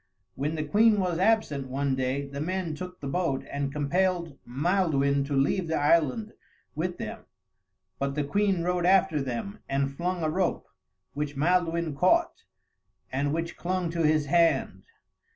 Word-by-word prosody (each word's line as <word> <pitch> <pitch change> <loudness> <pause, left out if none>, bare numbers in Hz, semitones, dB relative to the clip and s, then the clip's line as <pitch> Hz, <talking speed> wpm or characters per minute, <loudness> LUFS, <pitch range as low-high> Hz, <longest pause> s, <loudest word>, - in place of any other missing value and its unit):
When 145 +7 -2
the 155 - -2
queen 210 +7 +4
was 180 -3 0
absent, 185 -10 +1
one 135 +1 -1
day, 130 +2 -1
the 140 +1 -6
men 180 0 -2
took 180 +3 -7
the 140 - -6
boat 160 -2 -1
and 140 -1 -2
compelled 170 +2 0
Maelduin 140 -1 +1
to 140 0 -2
leave 145 +6 +1
the 160 - 0
island 165 - +2 0.4
with 175 +3 -3
them; - - -7 0.7
but 140 0 -1
the 150 - 0
queen 195 +3 +1
rode 180 0 +1
after 190 -5 +4
them 135 - -4
and 135 0 0
flung 175 +2 -2
a 155 - +1
rope, 185 +1 0 0.5
which 145 -1 -4
Maelduin 170 0 +1
caught 325 - +2 0.7
and 140 +2 0
which 165 +2 -3
clung 180 -1 -1
to 170 0 -2
his 155 -1 +3
hand. 165 +3 +2
160 Hz, 155 wpm, -27 LUFS, 140-180 Hz, 0.7 s, queen